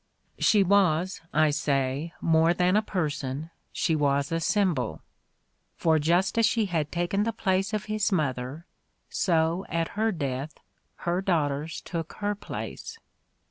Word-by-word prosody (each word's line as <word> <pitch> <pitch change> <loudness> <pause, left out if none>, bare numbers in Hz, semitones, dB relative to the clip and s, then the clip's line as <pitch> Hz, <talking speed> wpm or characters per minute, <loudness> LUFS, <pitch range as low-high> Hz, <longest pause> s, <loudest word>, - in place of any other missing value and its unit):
' - - -46
' - - -30
She 210 -2 +5
was, 185 -3 +2
I 155 0 +3
say, 140 +1 -1
more 165 +1 +3
than 180 +2 +2
a 215 - +5
person, 155 -6 -3 0.2
she 160 - 0
was 140 0 +1
a 165 - +1
symbol; 170 - 0 0.7
for 160 -2 +2
just 175 +8 +2
as 230 - +5
she 225 -2 +1
had 160 -6 -1
taken 175 +3 0
the 225 +2 +1
place 195 -2 0
of 215 -1 -2
his 215 -1 0
mother, 140 -2 -2 0.4
so 165 +1 +1
at 165 -1 -1
her 220 +2 0
death 140 -3 -4 0.5
her 175 +2 +1
daughters 155 -4 -1
took 165 -2 -5
her 205 0 -1
place. 455 - -7
170 Hz, 150 wpm, -27 LUFS, 150-195 Hz, 0.7 s, She